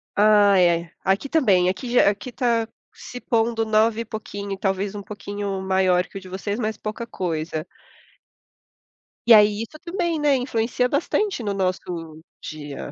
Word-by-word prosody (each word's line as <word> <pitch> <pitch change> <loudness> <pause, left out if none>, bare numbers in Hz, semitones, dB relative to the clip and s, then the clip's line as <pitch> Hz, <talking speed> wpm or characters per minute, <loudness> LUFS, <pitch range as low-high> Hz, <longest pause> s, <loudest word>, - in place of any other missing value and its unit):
Ah, 205 -2 +5
é. 170 -1 +2
Aqui 195 +9 0
também. 200 - +3
Aqui 225 +7 -4
já 245 -4 +5
aqui 205 +5 -5
tá 235 -3 +1 0.3
se 250 - -9
pondo 225 -1 0
9 220 +1 +2
e - - -5
pouquinho, 205 -2 -6
talvez 195 +1 -1
um 205 - -6
pouquinho 205 -1 -5
maior 190 -1 +2
que - - -9
o - - -7
de 190 - -12
vocês, 200 +4 -4
mas 215 -2 -2
pouca 220 +2 -5
coisa. 160 -5 -3 1.6
E 235 - +9
aí 210 0 +6
isso 230 +7 -8
também, 345 -2 -2
né, 295 -2 +3
influencia 250 -1 0
bastante 330 - 0
no 205 - -1
nosso 180 -4 -3 0.2
dia. 145 -2 -7
205 Hz, 160 wpm, -23 LUFS, 190-230 Hz, 1.6 s, E